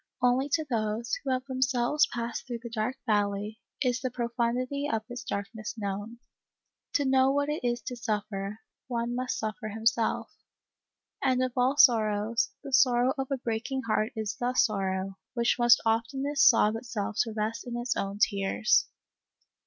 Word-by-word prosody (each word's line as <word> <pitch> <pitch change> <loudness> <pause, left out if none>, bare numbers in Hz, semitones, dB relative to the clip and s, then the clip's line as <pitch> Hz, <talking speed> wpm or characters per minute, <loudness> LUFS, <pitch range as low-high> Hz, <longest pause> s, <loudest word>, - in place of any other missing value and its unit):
Only 250 +3 +2
to 315 -2 +2
those, 225 -1 -2
who 275 - -3
have 255 0 0
themselves 260 +1 +2
passed 235 0 -4
through 240 -2 -5
the 235 - -7
dark 230 +3 -2
valley, 205 0 0 0.2
is 250 -1 0
the 255 - -1
profundity 245 +4 -1
of 220 -1 -1
its 245 +1 -6
darkness 215 +2 -5
known. 205 +2 -4 0.8
To 285 - +2
know 265 0 +4
what 285 +1 0
it 300 -2 -2
is 240 -1 -1
to 250 - -5
suffer, 210 -3 -3 0.3
one 235 -1 -2
must 250 +1 -2
suffer 220 +1 -4
himself; 225 +1 0 0.9
and 255 -1 +2
of 255 - -1
all 255 +3 +2
sorrows, 225 0 +4
the 275 - -8
sorrow 250 -1 +4
of 270 -2 -3
a 275 - 0
break 230 -1 -3
ing 265 -1 -2
heart 215 -1 0
is 215 -4 -3
the 250 +1 -1
sorrow, 195 -4 0 0.2
which 235 -1 +2
must 240 0 +6
oftenest 270 +7 +3
sob 220 -3 +4
itself 225 -3 -4
to 225 -2 +1
rest 225 +3 -2
in 240 -1 -4
its 240 0 -1
own 195 +1 -3
tears. 200 +2 +2
235 Hz, 165 wpm, -28 LUFS, 215-255 Hz, 0.9 s, must